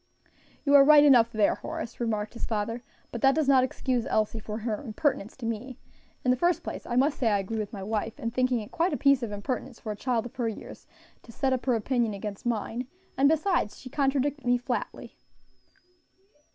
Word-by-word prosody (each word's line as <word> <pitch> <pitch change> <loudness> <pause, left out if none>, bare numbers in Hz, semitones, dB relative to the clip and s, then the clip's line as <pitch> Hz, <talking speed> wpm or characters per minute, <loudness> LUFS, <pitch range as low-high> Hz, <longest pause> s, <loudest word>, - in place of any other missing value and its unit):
"You 285 - +3
are 280 -1 +9
right 295 +1 +8
enough 245 -5 +6
there, 215 -2 +3
Horace," 320 -7 -6
remarked 215 -3 -2
his 235 - -5
father, 225 +2 -2 0.3
"but 235 - -5
that 270 0 +5
does 310 -3 +1
not 265 -2 +5
excuse 255 -2 -1
Elsie 215 +1 0
for 210 0 -6
her 220 -1 -3
impertinence 230 -2 -2
to 250 - -7
me. 230 +3 -4 0.5
In 250 - +4
the 250 - +2
first 345 +6 +1
place, - - -6
I 240 - -2
must 275 +4 +2
say 235 - +2
I 205 - +3
agree 200 +3 -3
with 210 -2 -4
my 195 -3 -7
wife 215 +1 -3
in 230 - -3
thinking 255 -1 +1
it 210 - -10
quite 335 0 0
a - - 0
piece 275 -2 +4
of 230 -3 -4
impertinence 240 +4 -4
for 220 - -5
a - - -4
child 240 +1 -1
of 245 - -9
her 235 -3 0
years 220 - -10 0.3
to 230 - -14
set 265 +3 0
up 260 +1 -3
her 250 - +3
opinion 230 -1 0
against 200 +2 -6
mine; 235 +2 -2 0.3
and 275 +2 +4
besides, 320 - +1
she 255 - -10
contradicted 280 0 0
me 245 0 +4
flatly." 245 - -5
245 Hz, 215 wpm, -27 LUFS, 220-270 Hz, 0.5 s, are